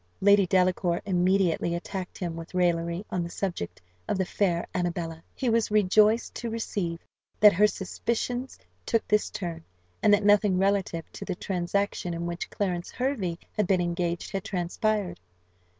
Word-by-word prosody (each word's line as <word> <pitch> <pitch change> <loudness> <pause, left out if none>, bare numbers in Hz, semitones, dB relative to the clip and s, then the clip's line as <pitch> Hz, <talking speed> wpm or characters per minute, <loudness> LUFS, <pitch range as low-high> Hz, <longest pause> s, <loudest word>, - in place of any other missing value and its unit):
Lady 200 -1 +5
Delacour 180 -1 +2
immediately 180 -2 +2
attacked 185 +1 -5
him 175 -3 -3
with 165 +2 -8
raillery, 170 +1 +1
on 180 - 0
the 170 - -4
subject 175 - -4 0.3
of - - 0
the 190 - +1
fair 175 -3 0
Annabella. 170 -2 -2
He 260 - -2
was 230 -1 +2
rejoiced 215 +2 +4
to 235 - -4
perceive 200 -6 -2 0.4
that 210 -1 +8
her 210 +5 +5
suspicions 235 +6 -3 0.3
took 230 - 0
this 210 0 +2
turn, 170 -3 -5 0.4
and 210 - +5
that 205 0 +4
nothing 205 -2 +5
relative 190 -4 +1
to - - -8
the - - -3
transaction 180 -1 -1
in 170 0 -3
which 170 0 -4
Clarence 180 -3 -2
Hervey 240 -10 -2 0.2
had 210 -4 +1
been 185 -1 +3
engaged 175 0 -2
had 195 -1 -3
transpired. 195 -1 -1
185 Hz, 155 wpm, -27 LUFS, 175-205 Hz, 0.4 s, that